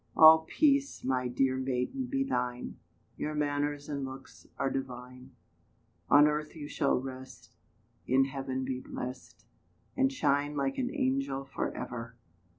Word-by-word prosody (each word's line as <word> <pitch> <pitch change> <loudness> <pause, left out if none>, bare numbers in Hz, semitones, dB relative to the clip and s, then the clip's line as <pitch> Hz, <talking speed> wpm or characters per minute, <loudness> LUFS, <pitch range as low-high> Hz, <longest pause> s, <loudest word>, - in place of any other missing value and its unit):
All 160 0 +9
peace, 280 -2 +2
my 130 -1 0
dear 130 +1 +1
maiden, 130 - -2
be 270 +1 0
thine: 125 - -3 0.4
Your 150 0 -3
manners 145 0 -1
and 140 -2 -3
looks 130 0 -9
are 135 -1 0
divine; 125 0 -6 0.7
On 145 - +8
earth 150 +1 -2
you 150 -2 -6
shall 140 -2 +1
rest, 130 0 -9 0.5
In 135 +1 +4
heaven 135 -1 -3
be 130 -1 -2
blest, 130 0 -7 0.5
And 270 0 +3
shine 145 - +1
like 135 - -1
an 250 -1 0
angel 265 - -1
for 135 - -3
ever. 115 -1 -6
135 Hz, 140 wpm, -31 LUFS, 130-150 Hz, 0.7 s, All